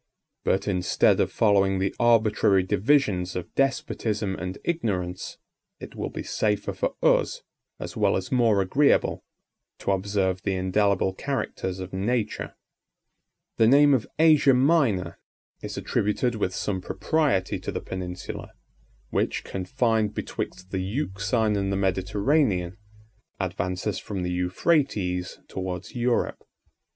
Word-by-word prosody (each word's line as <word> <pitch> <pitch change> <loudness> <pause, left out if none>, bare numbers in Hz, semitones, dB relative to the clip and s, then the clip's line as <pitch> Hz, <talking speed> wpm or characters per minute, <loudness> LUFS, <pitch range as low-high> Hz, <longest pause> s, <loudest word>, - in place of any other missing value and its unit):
But, 95 +2 0
instead 90 -3 +2
of - - +1
following 100 -3 +3
the 95 +1 -1
arbitrary 110 -5 +4
divisions 95 -3 +1
of 90 - -5
despotism 110 -7 -1
and 90 +1 -5
ignorance, 95 - -2 0.4
it - - -9
will - - -3
be - - -6
safer 105 -1 -1
for - - -2
us, - - +2 0.4
as - - -6
well - - +2
as 95 - -5
more 115 -6 +3
agreeable, 140 +10 +2 0.5
to - - -1
observe 95 -1 0
the 95 - -1
indelible 95 +1 +1
characters 95 -7 -3
of 95 0 -7
nature. 110 +3 -2 1.0
The 110 - +5
name 145 +3 +6
of 125 -5 +1
Asia 155 -4 +5
Minor 125 - +2 0.4
is - - -6
attributed 105 +4 0
with 95 -4 -2
some 95 -3 -2
propriety 100 - 0
to - - -5
the - - -3
peninsula, 90 -1 -6 0.6
which, - - 0
confined 110 +2 0
betwixt 90 +1 -5
the 95 - -1
Euxine 105 0 -1
and 100 -1 -1
the 95 - 0
Mediterranean, 95 - +1 0.6
advances 90 +3 -2
from 95 -3 -5
the 90 - -2
Euphrates 90 - 0
towards 90 -1 -5
Europe. 120 0 0
100 Hz, 125 wpm, -25 LUFS, 95-120 Hz, 1.0 s, name